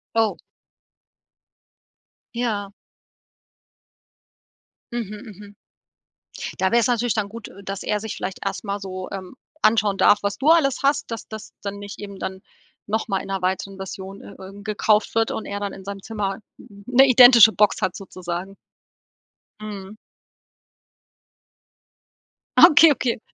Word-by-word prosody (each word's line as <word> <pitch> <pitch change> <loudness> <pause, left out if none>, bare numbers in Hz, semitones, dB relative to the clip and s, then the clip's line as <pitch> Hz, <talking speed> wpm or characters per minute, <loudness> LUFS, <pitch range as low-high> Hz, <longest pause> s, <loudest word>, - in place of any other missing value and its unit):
Oh. 225 -1 +2 2.0
Ja. 215 -5 -2 2.2
Mhm, 215 -1 -6
mhm. 205 0 -13 1.0
Da 190 0 +1
wär's 235 +1 +3
natürlich 245 -2 +1
dann 215 -3 -1
gut, 230 +1 -9
äh, 200 - -14
dass 195 0 -5
er 210 0 -1
sich 220 0 -6
vielleicht 185 0 -5
erstmal 200 +1 -3
so, 185 -1 -7
ähm, 190 +4 -7 0.3
anschauen 210 -3 +3
darf, 205 +1 +5
was 200 0 -1
du 275 - -1
alles 315 -5 +4
hast, 280 -3 +1
dass 225 - -6
das 220 -1 -9
dann 200 0 -5
nicht 205 0 -9
eben 200 -1 -8
dann 190 0 -5 0.5
noch 220 +2 -1
mal 195 - 0
in - - -10
'ner 195 -1 -2
weiteren 190 +1 -2
Version, 190 0 -8
äh - - -12
äh, 190 +1 -10
gekauft 215 0 +1
wird 225 0 +2
und 220 - -4
er 200 0 -4
dann 200 -1 -3
in 190 - -11
seinem 200 0 -6
Zimmer 200 -2 -4 0.2
'n 200 0 -15
'ne 250 +2 +6
identische 245 -3 +8
Box 210 -1 +2
hat 185 - -1
sozusagen. 185 0 -6 1.0
Mhm. 210 -1 -8 2.6
Okay, 325 -1 +8
okay. 250 -3 -2
205 Hz, 140 wpm, -22 LUFS, 195-225 Hz, 2.6 s, identische